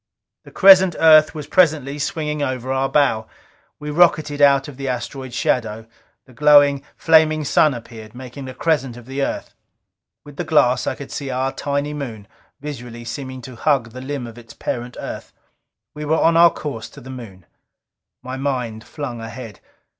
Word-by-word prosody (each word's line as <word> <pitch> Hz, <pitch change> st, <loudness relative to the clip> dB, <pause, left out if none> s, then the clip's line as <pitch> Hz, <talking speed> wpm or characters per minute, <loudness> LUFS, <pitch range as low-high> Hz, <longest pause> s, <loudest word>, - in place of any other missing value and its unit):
The -, -, -14 dB
crescent 190 Hz, -3 st, +7 dB
Earth 155 Hz, -1 st, +6 dB
was 150 Hz, -2 st, -6 dB
presently 150 Hz, -4 st, +2 dB
swinging 150 Hz, 0 st, -3 dB
over 130 Hz, -2 st, -3 dB
our 135 Hz, 0 st, 0 dB
bow. 115 Hz, -7 st, +1 dB, 0.5 s
We 150 Hz, 0 st, -6 dB
rocketed 155 Hz, -3 st, +2 dB
out 140 Hz, -1 st, +5 dB
of 140 Hz, -3 st, -10 dB
the 135 Hz, -1 st, -5 dB
asteroid's 130 Hz, +1 st, -5 dB
shadow. 110 Hz, -2 st, -1 dB, 0.4 s
The 130 Hz, -, -18 dB
glowing, 145 Hz, 0 st, +5 dB
flaming 155 Hz, -1 st, +4 dB
Sun 150 Hz, 0 st, +3 dB
appeared, 115 Hz, -1 st, -11 dB
making 130 Hz, +1 st, -9 dB
a 130 Hz, -, -9 dB
crescent 135 Hz, -6 st, -1 dB
of 120 Hz, -, -12 dB
the 135 Hz, +2 st, -4 dB
Earth. -, -, -3 dB, 0.7 s
With 145 Hz, -1 st, -13 dB
the -, -, -2 dB
glass 130 Hz, -6 st, +2 dB
I -, -, -1 dB
could 140 Hz, -, -10 dB
see 140 Hz, -2 st, -5 dB
our 130 Hz, +1 st, -1 dB
tiny 140 Hz, +1 st, -3 dB
Moon, 115 Hz, -9 st, -7 dB, 0.3 s
visually 120 Hz, -5 st, -8 dB
seeming 130 Hz, +2 st, -7 dB
to 125 Hz, +1 st, -10 dB
hug 130 Hz, -2 st, 0 dB
the 130 Hz, +2 st, -9 dB
limb 135 Hz, -1 st, -5 dB
of 120 Hz, 0 st, -10 dB
its 115 Hz, -1 st, -15 dB
parent 120 Hz, +1 st, -5 dB
Earth. -, -, -7 dB, 0.6 s
We 150 Hz, -, -7 dB
were 155 Hz, +2 st, +1 dB
on 165 Hz, 0 st, +3 dB
our 170 Hz, +1 st, +7 dB
course 125 Hz, -7 st, -6 dB
to -, -, -14 dB
the 130 Hz, -, -10 dB
Moon. 105 Hz, -8 st, -10 dB, 0.8 s
My 130 Hz, +1 st, -6 dB
mind 125 Hz, -5 st, -3 dB
flung 125 Hz, -6 st, -6 dB
ahead. 115 Hz, -2 st, -9 dB
135 Hz, 175 wpm, -20 LUFS, 120-150 Hz, 0.8 s, crescent